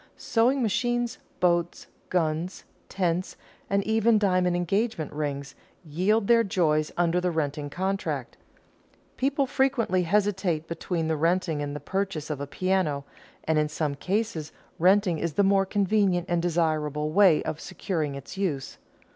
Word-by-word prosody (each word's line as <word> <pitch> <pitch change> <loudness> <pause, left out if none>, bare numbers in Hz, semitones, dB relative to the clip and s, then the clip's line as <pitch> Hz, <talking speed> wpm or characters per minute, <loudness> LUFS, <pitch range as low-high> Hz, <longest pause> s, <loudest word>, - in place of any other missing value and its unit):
Sewing 250 +3 +2
machines, 240 +2 0 0.2
boats, 175 -1 +1 0.2
guns, 165 +1 -1 0.3
tents, 180 -1 -1 0.3
and 200 0 +1
even 220 +1 +3
diamond 185 -3 +2
engagement 175 -1 -1
rings, 140 -2 -3 0.3
yield 190 +8 +1
their 230 +1 +5
joys 155 -6 +1
under 175 0 +2
the 180 - +1
renting 145 -3 -2
contract. 190 +5 -3 0.8
People 275 +1 +1
frequently 255 -8 +1
hesitate 190 -3 0
between 170 -1 -2
the 160 - +1
renting 165 0 +1
and 145 0 -4
the - - -4
purchase 175 -1 -3
of 145 -2 -4
a 145 - -4
piano, 170 -4 0 0.4
and 160 -1 +1
in 150 0 +1
some 150 -1 -2
cases 180 0 -2 0.3
renting 185 -1 +3
is 165 -2 -2
the 200 - +3
more 195 0 +3
convenient 195 -3 +1
and 175 -1 +1
desirable 155 -3 0
way 185 -3 +5
of 155 - -4
securing 160 -5 -3
its 140 +6 -9
use. 160 -9 -3
180 Hz, 140 wpm, -26 LUFS, 155-200 Hz, 0.8 s, their